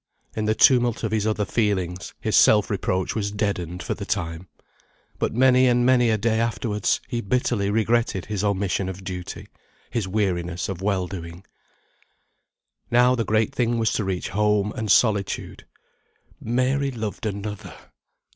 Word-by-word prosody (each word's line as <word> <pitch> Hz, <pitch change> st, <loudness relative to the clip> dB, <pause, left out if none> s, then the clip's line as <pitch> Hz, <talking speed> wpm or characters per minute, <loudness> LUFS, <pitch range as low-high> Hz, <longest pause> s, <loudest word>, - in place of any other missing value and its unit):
In 110 Hz, -, -2 dB
the 110 Hz, +1 st, +1 dB
tumult 120 Hz, 0 st, +4 dB
of 110 Hz, -, -1 dB
his 110 Hz, -1 st, 0 dB
other 105 Hz, -1 st, 0 dB
feelings, 95 Hz, -6 st, -2 dB
his -, -, -1 dB
self 105 Hz, -1 st, +5 dB
reproach 95 Hz, -2 st, -1 dB
was 105 Hz, -2 st, -2 dB
deadened 95 Hz, -4 st, -3 dB
for -, -, -2 dB
the 100 Hz, -, -7 dB
time. 90 Hz, -3 st, -3 dB, 0.7 s
But -, -, 0 dB
many 130 Hz, +1 st, +5 dB
and 120 Hz, 0 st, +3 dB
many 125 Hz, -2 st, +4 dB
a 110 Hz, -, +2 dB
day 110 Hz, +1 st, 0 dB
afterwards 115 Hz, -2 st, 0 dB
he 120 Hz, -2 st, -3 dB
bitterly 110 Hz, -2 st, 0 dB
regretted 110 Hz, -2 st, +1 dB
his 105 Hz, -2 st, -3 dB
omission 100 Hz, -2 st, 0 dB
of 95 Hz, +1 st, -7 dB
duty; 90 Hz, -1 st, -6 dB, 0.4 s
his 110 Hz, -5 st, -2 dB
weariness 90 Hz, -4 st, -1 dB
of 95 Hz, -2 st, -5 dB
well 95 Hz, -2 st, 0 dB
doing. 85 Hz, 0 st, -8 dB, 1.4 s
Now, 125 Hz, +1 st, +4 dB
the 120 Hz, -3 st, 0 dB
great 110 Hz, 0 st, +1 dB
thing 120 Hz, -1 st, 0 dB
was 115 Hz, -1 st, +1 dB
to 105 Hz, -, 0 dB
reach 95 Hz, -2 st, -3 dB
home, 105 Hz, 0 st, +1 dB
and 110 Hz, -1 st, -4 dB
solitude. 105 Hz, -4 st, +1 dB, 0.7 s
Mary 130 Hz, +4 st, 0 dB
loved 110 Hz, -2 st, -4 dB
another! 105 Hz, 0 st, -6 dB
105 Hz, 155 wpm, -23 LUFS, 95-115 Hz, 1.4 s, self